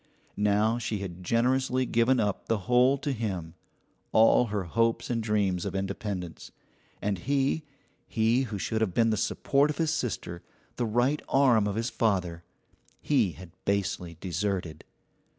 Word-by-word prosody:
Now 105 Hz, +3 st, +2 dB
she 110 Hz, -2 st, -2 dB
had 90 Hz, -2 st, -7 dB
generously 130 Hz, +4 st, +1 dB
given 120 Hz, +2 st, +2 dB
up 105 Hz, -3 st, -1 dB
the 115 Hz, -, +1 dB
whole 125 Hz, +2 st, +4 dB
to 140 Hz, +1 st, -3 dB
him, 95 Hz, -9 st, -4 dB, 0.6 s
all 115 Hz, +2 st, +5 dB
her 105 Hz, -2 st, -2 dB
hopes 115 Hz, +8 st, 0 dB
and 115 Hz, -1 st, 0 dB
dreams 100 Hz, -5 st, 0 dB
of -, -, -4 dB
independence; 95 Hz, -2 st, -4 dB, 0.5 s
and 100 Hz, -2 st, -1 dB
he 140 Hz, -, 0 dB, 0.5 s
he 115 Hz, +3 st, +2 dB
who 110 Hz, -4 st, -5 dB
should 110 Hz, +3 st, -2 dB
have 100 Hz, -6 st, 0 dB
been 115 Hz, -1 st, +3 dB
the -, -, +2 dB
support 140 Hz, +7 st, +1 dB
of 150 Hz, -, -3 dB
his 160 Hz, -2 st, +1 dB
sister, 90 Hz, -, -3 dB, 0.4 s
the 120 Hz, -, 0 dB
right 120 Hz, +7 st, +1 dB
arm 125 Hz, -6 st, +4 dB
of 100 Hz, -, -2 dB
his 115 Hz, +2 st, -2 dB
father 90 Hz, -7 st, 0 dB, 0.6 s
he 120 Hz, -, +1 dB
had 90 Hz, +1 st, -12 dB
basely 90 Hz, -4 st, -2 dB
deserted. 90 Hz, -3 st, -3 dB
110 Hz, 150 wpm, -28 LUFS, 95-125 Hz, 0.6 s, all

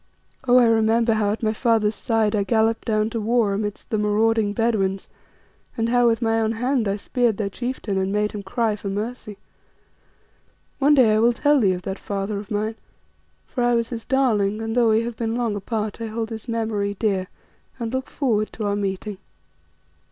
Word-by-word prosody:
Oh! 245 Hz, +1 st, +6 dB
I 245 Hz, -, +6 dB
remember 225 Hz, 0 st, +3 dB
how 210 Hz, -2 st, +1 dB
at 220 Hz, -, -4 dB
my 215 Hz, 0 st, +1 dB
father's 225 Hz, -2 st, +2 dB
side 220 Hz, -1 st, 0 dB
I 205 Hz, -, +2 dB
galloped 225 Hz, +2 st, +1 dB
down 215 Hz, 0 st, +1 dB
to 230 Hz, -, -2 dB
war 225 Hz, -2 st, +2 dB
against 205 Hz, 0 st, -4 dB
the 215 Hz, -, +1 dB
marauding 210 Hz, 0 st, +2 dB
Bedouins, 200 Hz, -3 st, 0 dB, 0.7 s
and 225 Hz, 0 st, 0 dB
how 245 Hz, 0 st, +4 dB
with 230 Hz, +1 st, +1 dB
my 225 Hz, 0 st, +2 dB
own 220 Hz, 0 st, 0 dB
hand 245 Hz, 0 st, 0 dB
I 195 Hz, -, 0 dB
speared 235 Hz, +1 st, 0 dB
their 200 Hz, -2 st, -2 dB
chieftain 240 Hz, -4 st, -3 dB
and 190 Hz, 0 st, -1 dB
made 210 Hz, +1 st, 0 dB
him 210 Hz, -, -6 dB
cry 215 Hz, +2 st, -1 dB
for 200 Hz, -1 st, -6 dB
mercy. 210 Hz, +1 st, -5 dB, 1.4 s
One 290 Hz, +2 st, +5 dB
day 240 Hz, -6 st, +5 dB
I 215 Hz, -, +3 dB
will 235 Hz, +2 st, +4 dB
tell 290 Hz, +4 st, +3 dB
thee 195 Hz, -6 st, +3 dB
of 180 Hz, 0 st, -6 dB
that 190 Hz, +1 st, -4 dB
father 200 Hz, 0 st, -3 dB
of 205 Hz, -, -10 dB
mine, 215 Hz, +1 st, -2 dB, 0.7 s
for 245 Hz, -, -3 dB
I 240 Hz, 0 st, +3 dB
was 230 Hz, -1 st, 0 dB
his 230 Hz, -2 st, -5 dB
darling, 220 Hz, -6 st, +1 dB
and 225 Hz, 0 st, -3 dB
though 240 Hz, -2 st, +4 dB
we 220 Hz, +1 st, +3 dB
have 230 Hz, -1 st, -5 dB
been 225 Hz, -1 st, -2 dB
long 235 Hz, -3 st, -1 dB
apart, 215 Hz, +1 st, -3 dB
I 225 Hz, -, -3 dB
hold 225 Hz, +1 st, -4 dB
his 225 Hz, +2 st, -7 dB
memory 220 Hz, -3 st, -1 dB
dear 195 Hz, -4 st, 0 dB, 0.5 s
and 235 Hz, -1 st, -4 dB
look 260 Hz, 0 st, -3 dB
forward 220 Hz, -7 st, 0 dB
to 215 Hz, -, -4 dB
our 200 Hz, 0 st, 0 dB
meeting. 200 Hz, 0 st, -3 dB
220 Hz, 200 wpm, -23 LUFS, 205-235 Hz, 1.4 s, Oh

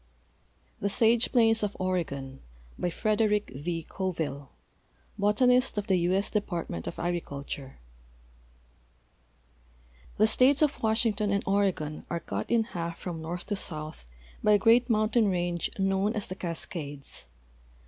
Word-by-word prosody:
THE 200 Hz, -, 0 dB
SAGE 230 Hz, +2 st, +3 dB
PLAINS 225 Hz, -2 st, +4 dB
OF 205 Hz, -1 st, -2 dB
OREGON 140 Hz, -8 st, -2 dB, 0.5 s
Frederick 210 Hz, +1 st, +1 dB
V. 165 Hz, +4 st, -4 dB
Coville, 160 Hz, -7 st, -3 dB, 0.7 s
Botanist 250 Hz, +4 st, +3 dB
of 205 Hz, -, -1 dB
the 190 Hz, -, +2 dB
U. 175 Hz, +1 st, +1 dB
S. 195 Hz, +2 st, +1 dB
Department 175 Hz, -, -3 dB
of -, -, -5 dB
Agriculture 140 Hz, -5 st, -4 dB, 2.4 s
The 215 Hz, -, +5 dB
states 260 Hz, +6 st, +4 dB
of 295 Hz, -, 0 dB
Washington 220 Hz, -2 st, +1 dB
and 200 Hz, 0 st, +1 dB
Oregon 190 Hz, -7 st, 0 dB
are 170 Hz, -, -1 dB
cut 100 Hz, -9 st, -4 dB
in 230 Hz, -1 st, +3 dB
half 170 Hz, -5 st, -5 dB
from 170 Hz, -3 st, -5 dB
north 170 Hz, +2 st, -5 dB
to 205 Hz, -, -2 dB
south 155 Hz, -, -5 dB, 0.4 s
by 210 Hz, -, +5 dB
a -, -, +7 dB
great 235 Hz, +5 st, +4 dB
mountain 215 Hz, 0 st, +3 dB
range 175 Hz, -2 st, -1 dB
known 195 Hz, +2 st, +1 dB
as 210 Hz, -, -2 dB
the 185 Hz, -, -6 dB
Cas 170 Hz, -4 st, -3 dB
cades. 145 Hz, -, -6 dB
195 Hz, 135 wpm, -28 LUFS, 165-215 Hz, 2.4 s, a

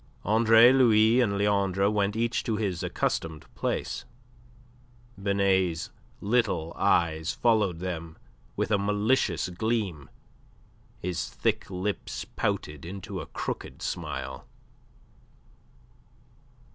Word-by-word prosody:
Andre 115 Hz, +3 st, +6 dB
Louis 115 Hz, -2 st, +5 dB
and 100 Hz, -5 st, +1 dB
Leandre 100 Hz, -1 st, +2 dB
went 105 Hz, -1 st, +1 dB
each 115 Hz, +1 st, 0 dB
to 110 Hz, -, 0 dB
his 100 Hz, -5 st, -2 dB
accustomed 80 Hz, -2 st, -2 dB
place. -, -, -2 dB, 1.2 s
Binet's 95 Hz, -4 st, +1 dB, 0.3 s
little 100 Hz, -7 st, 0 dB
eyes 85 Hz, -4 st, +1 dB
followed 105 Hz, -7 st, +2 dB
them 85 Hz, -2 st, -5 dB, 0.4 s
with -, -, -1 dB
a 100 Hz, -, +3 dB
malicious 105 Hz, +5 st, +1 dB
gleam, 95 Hz, -5 st, -2 dB, 0.9 s
his 90 Hz, -5 st, -3 dB
thick -, -, -1 dB
lips 95 Hz, +2 st, -3 dB
pouted 75 Hz, -2 st, -3 dB
into 95 Hz, +3 st, -6 dB
a -, -, -8 dB
crooked -, -, -5 dB
smile. 65 Hz, -5 st, -5 dB
100 Hz, 95 wpm, -27 LUFS, 85-110 Hz, 1.2 s, Andre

